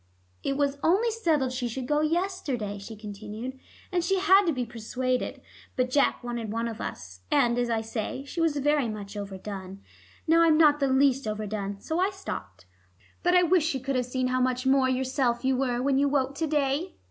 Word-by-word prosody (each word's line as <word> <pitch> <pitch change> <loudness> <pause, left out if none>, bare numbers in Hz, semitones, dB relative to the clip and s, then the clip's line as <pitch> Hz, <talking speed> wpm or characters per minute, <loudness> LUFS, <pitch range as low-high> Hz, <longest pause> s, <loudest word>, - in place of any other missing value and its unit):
"It 275 - -1
was 285 -1 0
only 405 +8 +3
settled 320 - +1
she 250 -1 -2
should 250 +2 -4
go 295 +1 +2
yesterday," 305 - -1
she 210 +3 -9
continued, 215 +5 -7 0.3
"and 355 -2 +1
she 385 +3 +1
had 385 +1 +5
to - - +4
be 255 -4 -2
persuaded. 250 +2 -3 0.3
But 250 0 0
Jack 280 -2 +2
wanted 240 -3 -4
one 230 +1 -1
of 225 -2 -6
us, 90 -2 -7
and, 240 -4 +3
as 240 -1 0
I 225 -1 +1
say, 225 +4 -4
she 335 +4 -4
was 320 -3 +2
very 290 -3 +2
much 205 -1 -7
overdone. 195 -1 -7 0.4
Now 330 +1 +5
I'm 325 -2 +5
not 300 -2 +5
the 275 - +2
least 265 -1 +3
overdone. 210 -2 -4
So 320 +2 -2
I 375 +2 +3
stopped. 95 - -7 0.6
But 355 +1 +3
I 360 - +6
wish 350 -1 +4
she 300 -4 -1
could 270 +1 -2
have 250 -1 0
seen 255 0 -1
how 255 0 +1
much 255 0 0
more 265 -1 +4
yourself 260 -1 0
you 265 0 +3
were 250 -1 0
when 270 0 +2
you 285 0 +3
woke 275 -1 +1
to 320 - 0
day." 295 +4 0
260 Hz, 205 wpm, -27 LUFS, 230-300 Hz, 0.6 s, I